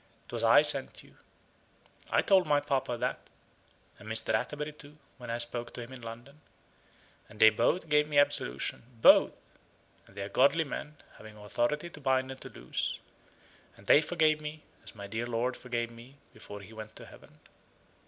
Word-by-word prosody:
'Twas -, -, -3 dB
I -, -, +7 dB
sent -, -, 0 dB
you. -, -, -20 dB, 0.9 s
I -, -, +2 dB
told 190 Hz, -4 st, +4 dB
my 145 Hz, -1 st, +4 dB
papa 135 Hz, -4 st, -1 dB
that, 125 Hz, +2 st, -3 dB, 0.7 s
and 105 Hz, +1 st, -11 dB
Mr. 110 Hz, 0 st, +1 dB
Atterbury 150 Hz, 0 st, -2 dB
too, 150 Hz, 0 st, -14 dB, 0.2 s
when 120 Hz, -1 st, -9 dB
I 115 Hz, -, -1 dB
spoke 120 Hz, 0 st, -4 dB
to -, -, -5 dB
him 120 Hz, +3 st, -11 dB
in 130 Hz, -, -10 dB
London. 120 Hz, +6 st, -10 dB, 0.9 s
And 105 Hz, 0 st, -15 dB
they 110 Hz, 0 st, +8 dB
both 140 Hz, +10 st, +1 dB
gave 150 Hz, -1 st, +3 dB
me 145 Hz, -, -1 dB
absolution 145 Hz, -, +1 dB, 0.2 s
both -, -, +7 dB, 0.7 s
and 100 Hz, -, -20 dB
they 100 Hz, -, -3 dB
are 100 Hz, -, -6 dB
godly 140 Hz, +9 st, +4 dB
men, 150 Hz, 0 st, -7 dB, 0.2 s
having 110 Hz, 0 st, -12 dB
authority 120 Hz, +10 st, -2 dB
to 150 Hz, -, -11 dB
bind 130 Hz, -1 st, +1 dB
and 130 Hz, -, -10 dB
to -, -, -8 dB
loose. 60 Hz, -, -4 dB, 0.8 s
And 100 Hz, -, -17 dB
they 145 Hz, -, +6 dB
forgave 155 Hz, -1 st, +2 dB
me, 150 Hz, 0 st, -7 dB, 0.2 s
as -, -, -9 dB
my 100 Hz, -1 st, -8 dB
dear 110 Hz, +4 st, -4 dB
lord 120 Hz, +2 st, -1 dB
forgave 120 Hz, -2 st, -3 dB
me 120 Hz, +4 st, -14 dB, 0.2 s
before 105 Hz, 0 st, -10 dB
he 100 Hz, +3 st, -13 dB
went 110 Hz, 0 st, -9 dB
to -, -, -11 dB
heaven." -, -, -16 dB
125 Hz, 180 wpm, -30 LUFS, 115-150 Hz, 0.9 s, they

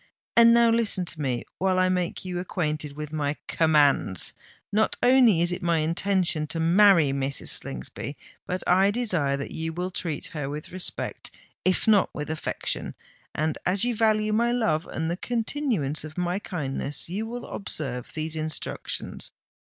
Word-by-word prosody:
"And 235 Hz, 0 st, +8 dB
now 235 Hz, 0 st, +5 dB
listen 220 Hz, -5 st, +2 dB
to 155 Hz, -2 st, -4 dB
me, 125 Hz, -4 st, -1 dB
while 185 Hz, 0 st, +2 dB
I 185 Hz, 0 st, +4 dB
make 180 Hz, 0 st, -1 dB
you 180 Hz, -1 st, -3 dB
acquainted 155 Hz, -5 st, -2 dB
with 150 Hz, 0 st, -6 dB
my 145 Hz, -1 st, -1 dB
commands! 145 Hz, -, +3 dB, 0.4 s
Not 215 Hz, +1 st, +2 dB
only 245 Hz, -8 st, +6 dB
is 175 Hz, +1 st, +2 dB
it 180 Hz, +2 st, -3 dB
my 170 Hz, -2 st, +2 dB
intention 170 Hz, 0 st, +1 dB
to 165 Hz, -, -2 dB
marry 170 Hz, -2 st, +5 dB
Mrs. 135 Hz, 0 st, -2 dB
Slingsby, 65 Hz, -1 st, -2 dB, 0.3 s
but 180 Hz, 0 st, -3 dB
I 190 Hz, +2 st, +5 dB
desire 180 Hz, -, 0 dB
that 140 Hz, -, -5 dB
you 160 Hz, 0 st, -3 dB
will 180 Hz, +2 st, -3 dB
treat 165 Hz, -4 st, -3 dB
her 145 Hz, -3 st, -3 dB
with 150 Hz, +1 st, -6 dB
respect—if 185 Hz, +1 st, -3 dB
not 210 Hz, -3 st, +5 dB
with 150 Hz, +1 st, -4 dB
affection. 160 Hz, -, -3 dB, 0.4 s
And 155 Hz, 0 st, -1 dB
as 185 Hz, +2 st, +1 dB
you 240 Hz, -1 st, +1 dB
value 215 Hz, -1 st, +2 dB
my 235 Hz, +2 st, +2 dB
love 195 Hz, -11 st, 0 dB
and 160 Hz, +1 st, -2 dB
the 175 Hz, -, -2 dB
continuance 225 Hz, -, -1 dB
of 155 Hz, +1 st, -9 dB
my 180 Hz, +2 st, -1 dB
kindness, 145 Hz, -6 st, -3 dB
you 205 Hz, +6 st, -3 dB
will 240 Hz, +1 st, -6 dB
observe 130 Hz, -, -4 dB
these 155 Hz, 0 st, -2 dB
instructions. 155 Hz, -1 st, -3 dB
175 Hz, 160 wpm, -26 LUFS, 150-205 Hz, 0.4 s, And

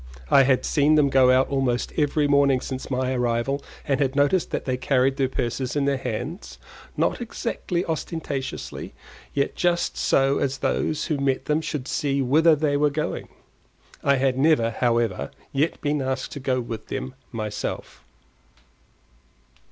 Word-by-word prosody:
I -, -, +8 dB
had 130 Hz, -1 st, +2 dB
seen 150 Hz, +1 st, +3 dB
them 150 Hz, -2 st, +4 dB
go 130 Hz, -1 st, +5 dB
out 130 Hz, +1 st, +4 dB
almost 130 Hz, -3 st, 0 dB
every 150 Hz, -1 st, +2 dB
morning 140 Hz, -2 st, +4 dB
since 130 Hz, 0 st, -6 dB
my 130 Hz, 0 st, 0 dB
arrival 125 Hz, +3 st, 0 dB, 0.2 s
and 135 Hz, -2 st, +1 dB
had 135 Hz, -1 st, 0 dB
noticed 145 Hz, +6 st, +2 dB
that -, -, -3 dB
they 130 Hz, -, 0 dB
carried 130 Hz, +1 st, +1 dB
their 135 Hz, -2 st, +1 dB
purses 125 Hz, +1 st, -2 dB
in 145 Hz, -1 st, +1 dB
their 140 Hz, -1 st, +1 dB
hands, 150 Hz, -, -5 dB, 0.4 s
not -, -, 0 dB
exactly 200 Hz, -6 st, -3 dB
ostentatiously, 155 Hz, -4 st, -4 dB, 0.4 s
yet 140 Hz, -1 st, 0 dB
just 175 Hz, -1 st, 0 dB
so 135 Hz, +1 st, +2 dB
as 135 Hz, -1 st, -1 dB
that 135 Hz, -, 0 dB
those 155 Hz, -1 st, -1 dB
who 150 Hz, -4 st, -1 dB
met 135 Hz, -1 st, 0 dB
them 150 Hz, +1 st, +1 dB
should 145 Hz, -4 st, -4 dB
see 140 Hz, 0 st, 0 dB
whither 155 Hz, +5 st, +4 dB
they 145 Hz, -1 st, +1 dB
were 150 Hz, +1 st, +3 dB
going. 150 Hz, +2 st, -3 dB, 0.7 s
I 140 Hz, 0 st, +4 dB
had 130 Hz, -1 st, +1 dB
never, 135 Hz, -6 st, +3 dB
however, 115 Hz, -, 0 dB, 0.2 s
yet 150 Hz, +4 st, 0 dB
been 145 Hz, -1 st, 0 dB
asked 130 Hz, 0 st, -2 dB
to -, -, -6 dB
go 130 Hz, -1 st, 0 dB
with 115 Hz, -2 st, -7 dB
them 65 Hz, +1 st, -4 dB, 0.2 s
myself. 110 Hz, -2 st, -5 dB
135 Hz, 160 wpm, -24 LUFS, 130-145 Hz, 0.7 s, I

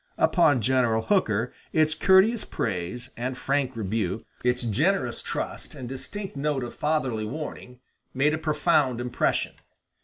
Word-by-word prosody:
Upon 155 Hz, -8 st, +4 dB
General 120 Hz, -2 st, +2 dB
Hooker 115 Hz, -, +1 dB, 0.2 s
its 155 Hz, 0 st, +3 dB
courteous 190 Hz, +7 st, +4 dB
praise 95 Hz, +8 st, -4 dB
and 125 Hz, +2 st, -3 dB
frank 135 Hz, -2 st, 0 dB
rebuke, 105 Hz, -1 st, -2 dB, 0.2 s
its 125 Hz, 0 st, +1 dB
generous 125 Hz, -, +1 dB
trust -, -, -5 dB
and 125 Hz, -, -7 dB
distinct 190 Hz, +10 st, -5 dB
note 140 Hz, -2 st, -1 dB
of 120 Hz, -, -6 dB
fatherly 140 Hz, -8 st, 0 dB
warning, 125 Hz, -1 st, -7 dB, 0.3 s
made 145 Hz, +4 st, +2 dB
a 160 Hz, -, -1 dB
profound 150 Hz, -5 st, +2 dB
impression. 125 Hz, 0 st, 0 dB
130 Hz, 130 wpm, -26 LUFS, 120-155 Hz, 0.3 s, Upon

